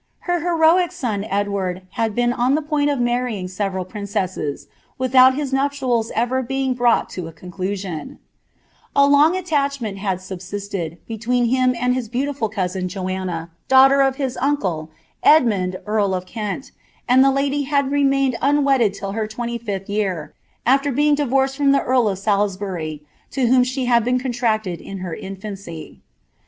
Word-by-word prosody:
Her 350 -1 0
heroic 340 +1 +3
Edward 200 -4 -2
had 225 -1 -1
been 240 0 +2
on 250 +3 +2
the 310 - -1
point 295 -1 +1
of 285 -3 0
marrying 240 -5 -1
several 190 0 -3
princesses, 185 -7 -3 0.3
with 255 0 -2
18 260 +2 +5
nuptials 265 -4 0
ever 245 +3 +1
being 265 +1 -1
brought 245 -1 +2
to 180 -3 -5
a - - -8
conclusion, 185 - -5 0.8
long 285 +5 +5
attachment 280 - -1
had 190 -2 -1
subsisted, 190 -2 -6
between 235 +2 0
him 255 -1 +2
and 250 +1 +2
his 250 -4 -3
beautiful 255 -2 -2
1, 185 -2 -2
Joanna, 185 -3 -4 0.2
daughter 270 +1 +6
of 270 -1 +2
his 265 -2 -3
uncle, 190 - -1 0.3
Edmund 205 -11 +4
eail 205 -3 +1
of 180 - -7
Kept, 215 +7 -5 0.4
and 255 +2 +6
the 275 +1 +2
had 280 -2 +1
remained 275 -2 +2
un 290 +1 +3
wedded 250 -8 +3
till 195 0 -5
her 215 +1 -2
twenty 235 +2 -4
fifth 200 -4 -5
year, 195 -7 -2 0.3
afler 275 +2 +2
being 295 +1 +3
»d 290 -1 0
from 270 +2 +2
the 275 - +2
earl 250 -3 +2
of 195 - -2
Salisbury, 195 -6 -2 0.3
to 265 -2 0
whom 250 +1 +5
she 255 +1 -2
had 235 -2 +3
been 250 +2 +1
contracted 230 -7 -1
in 195 -1 -8
lAuacy. 190 -1 -7
235 Hz, 150 wpm, -21 LUFS, 195-270 Hz, 0.8 s, daughter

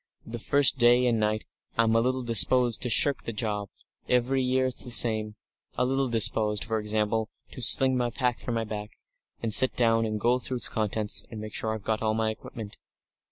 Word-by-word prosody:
The 115 +1 -8
first 140 +2 +3
day 120 +1 +4
and 120 -2 0
night 110 0 -2 0.3
I'm 115 -1 +2
a 115 - +3
little 130 +1 -2
disposed 120 +1 +3
to 125 - -2
shirk 140 +4 +2
the - - -4
job 105 -2 -4 0.4
every 125 +2 0
year 130 +1 0
it's 130 -1 -5
the - - -9
same 110 -3 +2 0.4
a 125 - +1
little 135 0 -1
disposed, 105 -2 +1
for 110 +1 -3
example, 110 +1 -2 0.2
to - - -9
sling 130 +1 +5
my 120 -1 -1
pack 125 0 -3
from 120 - -5
my 115 - -2
back, 105 -1 -8 0.5
and 110 -2 -1
sit 130 - +7
down, 115 -2 +1
and 110 -1 -4
go 120 +4 +1
through 130 +1 -4
its - - 0
contents, 110 -1 -1
and 110 - -9
make 110 0 -9
sure 110 0 -2
I've 110 - -10
got 110 0 -3
all 110 -1 -1
my 110 0 -1
equipment." 110 -1 -11
115 Hz, 205 wpm, -26 LUFS, 110-125 Hz, 0.5 s, sit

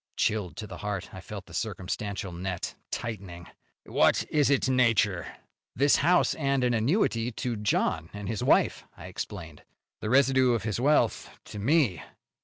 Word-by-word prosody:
Chilled 105 -5 0
to 110 - -5
the 95 -4 -9
heart, 105 -3 -4
I 95 - -8
felt 100 -2 -8
the 85 - -15
circumstantial 100 0 -3
net 90 +1 -4 0.2
tightening. 95 -7 -6 0.4
"What - - +3
is 150 -3 +3
its 140 -1 +2
nature?" 115 -8 +2 0.5
"This 140 +2 +4
house 175 +5 +3
and 140 -3 0
an 125 -1 +2
annuity 120 - +1
to 120 +1 -3
John 105 -6 0
and 100 -1 -7
his 110 0 -2
wife," - - +3
I - - -10
explained. - - -7 0.4
"The 110 - -4
residue 130 -1 +4
of 110 - -3
his 110 0 -2
wealth 135 -3 +2 0.2
to 105 - -8
me." 125 - +2
110 Hz, 160 wpm, -28 LUFS, 95-130 Hz, 0.5 s, This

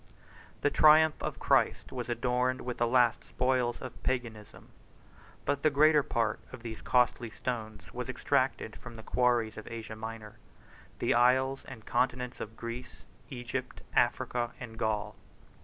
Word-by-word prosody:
The 145 - +2
triumph 155 0 +6
of - - -3
Christ - - +2
was 125 -2 -5
adorned 125 +2 0
with 125 -1 -5
the 120 - +3
last 120 -1 +3
spoils 125 -2 0
of 130 - -8
Paganism, 115 -5 -4 0.8
but 140 0 0
the 155 - +4
greater 150 +1 +5
part 115 -5 -1
of 130 -2 -10
these 110 -2 -6
costly 125 -1 +2
stones 110 -3 -5
was - - -5
extracted - - 0
from 120 - -10
the 110 - -10
quarries 120 -3 +1
of 110 - -8
Asia 115 -1 -6
Minor, 110 -1 -8 0.6
the - - +1
isles 130 +2 +3
and 120 -5 -10
continent 125 0 0
of 110 +1 -7
Greece, 120 +2 -7 0.3
Egypt, 125 -1 -5
Africa, 120 -1 +1
and 115 -3 -8
Gaul. 105 -1 -1
120 Hz, 145 wpm, -30 LUFS, 115-130 Hz, 0.8 s, triumph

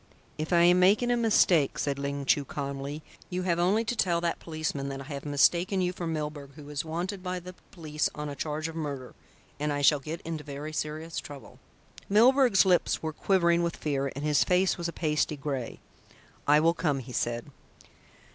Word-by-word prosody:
"If 155 +3 -3
I 170 -1 +5
am 175 +1 +6
making 210 +7 +4
a - - +3
mistake," 195 - +3
said 140 -1 -1
Ling 140 0 -3
Chu 140 +1 +3
calmly, 140 +2 -5 0.3
"you 180 0 -2
have 175 -2 0
only 200 +6 +2
to 245 - -1
tell 175 -6 +1
that 170 0 -1
policeman 155 -4 -3
that 135 0 -5
I - - -7
have 140 0 -7
mistaken 170 +7 +3
you 180 -1 0
for 175 -2 -5
Milburgh, 150 -3 -4
who 150 -2 -11
is 145 +2 -2
wanted 175 +5 -4
by 180 0 -3
the 180 +1 -10 0.2
police 155 -4 -2
on 150 0 -4
a 145 - -5
charge 155 +2 -3
of 165 - -8
murder, 140 -5 -5 0.5
and 150 0 -1
I 145 0 -2
shall 145 +1 +5
get 155 +5 -6
into 160 -2 -5
very 145 +1 -7
serious 155 +2 -4
trouble." 140 -2 -11 0.5
Milburgh's 240 0 +5
lips 180 -3 +2
were 160 -1 -2
quivering 170 -1 +2
with 170 0 -2
fear 140 -2 -1
and 140 +2 -4
his 150 -1 +3
face 185 +1 +2
was 170 -1 -3
a - - -3
pasty 150 -2 -1
grey. 135 -4 -4 0.7
"I 150 +1 +6
will 165 +1 +4
come," 150 -5 0
he 125 -1 -8
said. 120 +4 -2
155 Hz, 200 wpm, -28 LUFS, 145-180 Hz, 0.7 s, am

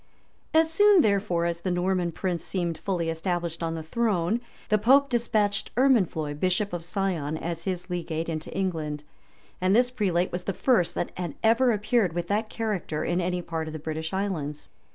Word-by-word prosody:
As 320 0 +5
soon, 410 0 +6
therefore, 195 -4 +1
as 170 0 -2
the 185 - -2
Norman 180 0 0
prince 175 0 -2
seemed 170 -4 -2
fully 180 -4 -1
established 170 0 -2
on 165 0 -1
the 160 - -5
throne, 210 +2 0 0.3
the 215 - +3
pope 275 +6 +5
despatched 215 -4 +1
Ermenfloy, 185 - +2
bishop 185 +2 0
of 175 -1 -3
Sion, 175 -5 -1
as 165 0 -4
his 185 -2 -2
legate 165 -3 -3
into 160 -1 -4
England; 160 -6 -2 0.6
and 185 +2 +3
this 245 +1 +4
prelate 185 -7 0
was 180 0 -4
the 195 - -1
first 225 -9 +2
that - - -2
had 175 -5 -3
ever 230 +3 +4
appeared 210 -3 +1
with 175 0 -3
that 215 +2 0
character 205 -9 -2
in 175 +2 0
any 180 0 -1
part 160 -2 -3
of 155 - -6
the - - -4
British 160 +1 -4
islands. 175 -7 -3
180 Hz, 180 wpm, -26 LUFS, 165-210 Hz, 0.6 s, soon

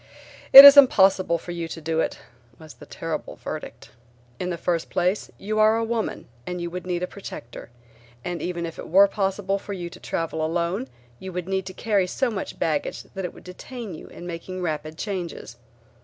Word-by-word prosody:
"It 275 +1 +14
is 280 0 +11
impossible 190 -9 +5
for 175 - -9
you 170 -1 -4
to 165 - -7
do 160 0 -2
it," - - -1 0.4
was 155 -2 -13
the - - -15
terrible - - -5
verdict. - - -8 0.5
"In 180 - -3
the 175 - -3
first 170 -1 -2
place 180 +3 -1
you 215 +2 -3
are 215 +1 +5
a 230 - 0
woman 225 -1 -3 0.2
and 180 0 -4
would 180 +1 -6
need 180 -1 -2
a - - -1
protector, 180 -12 -10 0.6
and 175 -1 -4
even 175 -1 -3
if 165 - -8
it - - -7
were 195 +4 +6
possible 195 0 -1
for 200 - -7
you 175 -3 -6
to - - -12
travel 160 -1 -3
alone 170 -1 -1 0.3
you 190 - -7
would 180 0 -5
need 190 0 -2
to 185 - -7
carry 205 -5 +1
so 255 +6 -1
much 195 -3 -5
baggage 155 -3 -2
that 190 -1 -4
it - - -6
would - - -14
detain 215 +3 -8
you 155 - -10
in 175 - -11
making 180 +2 -6
rapid 155 -1 -4
changes. 180 - -5
180 Hz, 200 wpm, -24 LUFS, 170-200 Hz, 0.6 s, It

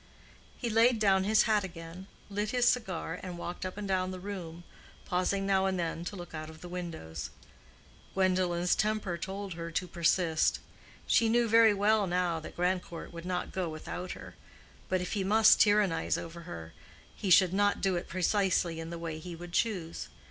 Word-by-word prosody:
He 240 - -3
laid 230 +2 +5
down 195 -3 +3
his 215 +1 +5
hat 215 -2 +2
again, 170 +1 -8 0.2
lit 205 +1 -2
his 245 +1 +2
cigar, 185 -7 0
and 180 -2 -6
walked 175 +2 -5
up 185 - -9
and 210 -1 -4
down 185 -1 0
the 185 0 -6
room, 175 -4 -7 0.4
pausing 185 +2 0
now 195 -1 +2
and 190 -1 0
then 165 0 -2
to 200 - -5
look 175 -3 -9
out 155 0 -6
of 160 0 -13
the 180 - -8
windows. 165 - -6 0.9
Gwendolen's 180 -2 +2
temper 215 -4 0
told 190 +2 -5
her 170 0 -6
to 175 +2 -2
persist. 170 -1 +2 0.5
She 230 - +3
knew 235 +1 +3
very 225 -1 +6
well 205 0 +3
now 175 -2 0
that 160 - -10
Grandcourt 180 -1 -2
would 170 0 -8
not 180 -1 -2
go 185 -3 -2
without 160 +3 -6
her; - - -10 0.6
but 185 -1 +1
if 180 - -4
he 200 -3 0
must 215 +3 +6
tyrannize 205 -5 +3
over 170 +1 -7
her, 80 - -8 0.4
he 200 - -3
should 180 0 +6
not 205 +1 +2
do 190 -2 +1
it 175 - -3
precisely 185 -2 +1
in 165 0 -6
the 170 - -5
way 165 -2 -5
he 175 +1 -7
would 175 +1 -10
choose. 180 -7 -1
185 Hz, 185 wpm, -30 LUFS, 170-200 Hz, 0.9 s, very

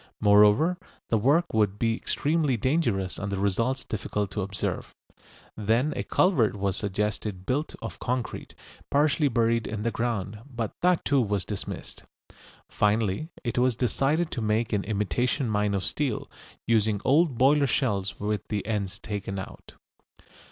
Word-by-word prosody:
Moreover, 105 - +5 0.3
the 115 - +4
work 150 +10 +2
would 105 -2 +2
be 115 +1 +1
extremely 150 0 0
dangerous 115 - 0
and 100 0 -3
the 100 - -1
results 115 +7 0
difficult 105 -2 -3
to 105 - -2
observe. 100 +1 -4 0.6
Then 115 +8 +1
a - - -1
culvert 135 - +2
was 100 -1 -1
suggested 105 -1 -2
built 145 +7 -1
of - - -6
concrete, 125 -1 -3 0.3
partly 150 +1 +3
buried 115 -2 +1
in 105 -1 -4
the 115 - 0
ground, 110 -3 -2
but 115 -4 -3
that 180 -1 +2
too 140 -2 +3
was 105 -4 -1
dismissed. 105 -3 -6 0.7
Finally 105 - 0
it 120 -1 -1
was 125 -1 +3
decided 135 +7 +1
to 120 - -3
make 110 +1 0
an 100 -2 0
imitation 110 - 0
mine 105 -1 +1
of 95 - -2
steel, 140 -7 -2 0.3
using 110 -2 +2
old 145 -1 +3
boiler 140 +3 +4
shells 105 -7 0
with 105 0 -2
the 105 -2 -2
ends 105 -3 -2
taken 100 -2 -5
out. 95 - -9
110 Hz, 150 wpm, -27 LUFS, 105-130 Hz, 0.7 s, Moreover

